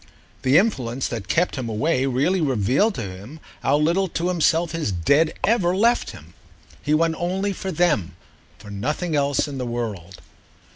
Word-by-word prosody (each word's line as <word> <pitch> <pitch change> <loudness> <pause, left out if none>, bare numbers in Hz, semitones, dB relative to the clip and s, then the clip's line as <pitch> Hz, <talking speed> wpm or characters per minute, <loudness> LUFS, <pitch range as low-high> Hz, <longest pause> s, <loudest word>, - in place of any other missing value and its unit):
The 130 +3 +4
influence 135 - 0
that 110 -5 -5
kept 170 - +1
him 125 -3 -3
away 130 +5 0
really 145 +9 +1
revealed 135 - +1
to 115 - -4
him 100 +10 -9 0.2
how 145 - +2
little 170 +6 +1
to 175 +1 -2
himself 170 -1 +2
his 165 -9 -2
Dead 140 - +2
ever 190 -5 +2
left 235 +4 +2
him. 80 +3 -12 0.5
He 150 - +1
went 165 +1 +2
only 190 +3 -1
for 190 0 -5
them—for 105 - -3
nothing 150 - -2
else 140 0 +1
in 140 -2 -6
the - - -2
world. 105 -7 -5
145 Hz, 160 wpm, -22 LUFS, 115-175 Hz, 0.5 s, The